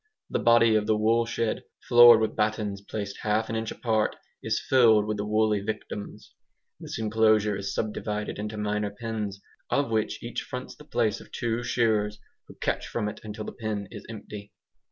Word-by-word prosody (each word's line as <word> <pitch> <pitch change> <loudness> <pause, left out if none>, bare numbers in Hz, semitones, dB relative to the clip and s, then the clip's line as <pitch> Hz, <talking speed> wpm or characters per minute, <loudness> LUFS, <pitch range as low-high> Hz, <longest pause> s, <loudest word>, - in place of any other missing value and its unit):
The - - +1
body 115 0 +5
of 105 -1 +2
the 110 -1 +3
woolshed, 115 +1 +1 0.3
floored 120 -2 +9
with 110 -1 -1
battens 105 -2 -1
placed 100 -1 -5
half 110 +1 0
an - - -2
inch 110 0 -2
apart, 110 -3 0 0.3
is - - 0
filled 115 -5 +5
with 110 0 -2
the 105 - -2
woolly 110 -1 +2
victims. 105 0 -6 0.5
This - - -6
enclosure 110 -1 +3
is 100 0 -4
subdivided 105 -1 -3
into 105 +1 -4
minor 105 0 -1
pens, 105 -2 -4 0.3
of 140 -4 +1
which 110 -1 -1
each 120 0 -4
fronts 125 0 -7
the 150 - -15
place 115 -7 0
of - - -16
two 115 0 -2
shearers, 110 -4 +1 0.3
who - - -13
catch - - -2
from 110 -3 -2
it 105 - -6
until 110 0 -6
the - - -5
pen 105 -4 -4
is 105 - -8
empty. 105 -2 -9
110 Hz, 175 wpm, -27 LUFS, 105-115 Hz, 0.5 s, floored